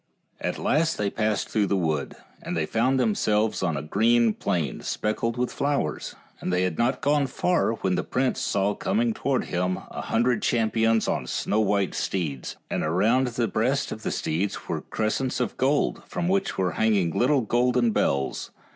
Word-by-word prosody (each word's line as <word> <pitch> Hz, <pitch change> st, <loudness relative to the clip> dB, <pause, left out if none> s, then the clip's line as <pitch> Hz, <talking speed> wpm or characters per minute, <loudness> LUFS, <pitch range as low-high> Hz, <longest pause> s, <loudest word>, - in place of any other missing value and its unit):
At -, -, -2 dB
last 160 Hz, +2 st, +1 dB
they 100 Hz, -1 st, -1 dB
passed 110 Hz, -1 st, 0 dB
through 105 Hz, -2 st, +1 dB
the 100 Hz, -, +1 dB
wood, 80 Hz, -6 st, -1 dB, 0.3 s
and 90 Hz, -, -4 dB
they 80 Hz, -, +1 dB
found 125 Hz, +8 st, +1 dB
themselves 110 Hz, -2 st, +1 dB
on 85 Hz, -5 st, 0 dB
a 70 Hz, -, -4 dB
green 115 Hz, +7 st, +3 dB
plain, 80 Hz, -9 st, -2 dB
speckled 115 Hz, +2 st, -2 dB
with 125 Hz, 0 st, -1 dB
flowers, 140 Hz, -, -1 dB, 0.2 s
and -, -, -3 dB
they 90 Hz, 0 st, +2 dB
had 90 Hz, -3 st, -2 dB
not 125 Hz, +2 st, +1 dB
gone 145 Hz, 0 st, +2 dB
far 175 Hz, -2 st, +1 dB
when 95 Hz, -4 st, -1 dB
the -, -, 0 dB
prince 130 Hz, 0 st, 0 dB
saw 100 Hz, +1 st, +1 dB
coming 220 Hz, -, 0 dB
towards 140 Hz, -, -1 dB
him 90 Hz, +1 st, 0 dB
a -, -, -5 dB
hundred 120 Hz, 0 st, +1 dB
cham 115 Hz, -2 st, +1 dB
pions 115 Hz, 0 st, +2 dB
on -, -, -1 dB
snow 105 Hz, -, 0 dB
white 100 Hz, -3 st, +1 dB
steeds, 75 Hz, -9 st, -3 dB
and -, -, -2 dB
around 110 Hz, +11 st, +2 dB
the 120 Hz, -1 st, -1 dB
breast 130 Hz, +7 st, 0 dB
of 110 Hz, -, -6 dB
the -, -, -2 dB
steeds 90 Hz, +6 st, -2 dB
were -, -, -2 dB
crescents 120 Hz, +5 st, -1 dB
of 125 Hz, -, -1 dB
gold, 140 Hz, +3 st, +1 dB
from 175 Hz, -, -2 dB
which 195 Hz, +1 st, 0 dB
were 95 Hz, -2 st, +1 dB
hanging 100 Hz, -3 st, +2 dB
little 130 Hz, -, +2 dB
golden 120 Hz, +1 st, +2 dB
bells. 70 Hz, -8 st, 0 dB
110 Hz, 180 wpm, -25 LUFS, 95-125 Hz, 0.3 s, green